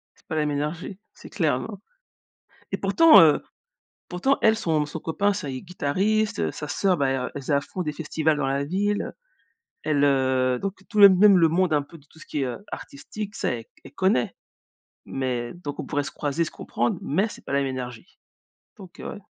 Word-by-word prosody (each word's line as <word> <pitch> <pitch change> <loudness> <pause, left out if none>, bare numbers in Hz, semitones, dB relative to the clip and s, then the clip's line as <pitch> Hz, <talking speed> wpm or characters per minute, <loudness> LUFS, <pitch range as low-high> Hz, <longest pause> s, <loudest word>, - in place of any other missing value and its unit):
C'est - - -29
pas 160 - -4
la 155 - +1
même 150 - -1
énergie. 160 +6 -4
C'est - - -13
clair, 155 -9 +1
non 205 +4 -7 0.9
et - - -1
pourtant, 330 -1 +7
heu, 155 -2 +5 0.7
pourtant 225 +11 +1
elle, 220 -1 +5
son 160 -8 0
son 155 - -6
copain, 200 +6 0
ça 165 -7 -5
il 130 - -4
est - - -11
guitariste, 200 +6 0
heu, - - 0
sa 150 - -7
sœur, 185 +2 +1
bah, 140 - +2
elle 135 0 0
r 125 - -3
elle 145 - -4
faisait 145 +2 0
à 140 - +3
fond 185 - -5
des 150 -3 -3
festivals 160 0 0
dans 145 -2 -1
la 140 +1 0
ville, 200 +6 0
heu, - - -6 0.7
elle, 145 -2 +2
heu 130 -2 +2
donc 195 -1 -2
tout 215 -2 0
le 200 - +12
même 195 +1 +6
le 165 -2 +5
monde, 175 +1 +1
un 150 -1 +3
peu 145 +4 -14
de 145 - -23
tout - - -20
ce - - -13
qui 145 - -2
est 130 - 0 0.2
artistique, 205 +9 -7
ça, - - -1
elle 115 -2 -5
c - - -42 0.2
elle - - -12
connaît. 185 -10 +1 0.7
Mais 125 -3 -3
donc 150 -5 -7
on - - -3
pourrait 145 - -1
se - - -6
croiser, 145 +3 -1
se - - -7
comprendre 120 +1 -2
mais 190 +9 +1
c'est - - -12
pas - - -5
la 140 - +3
même 140 - 0
énergie. 125 -3 -7 0.6
Donc 185 -3 -13
heu, - - -6
ouais. - - -9
155 Hz, 230 wpm, -25 LUFS, 140-190 Hz, 0.9 s, le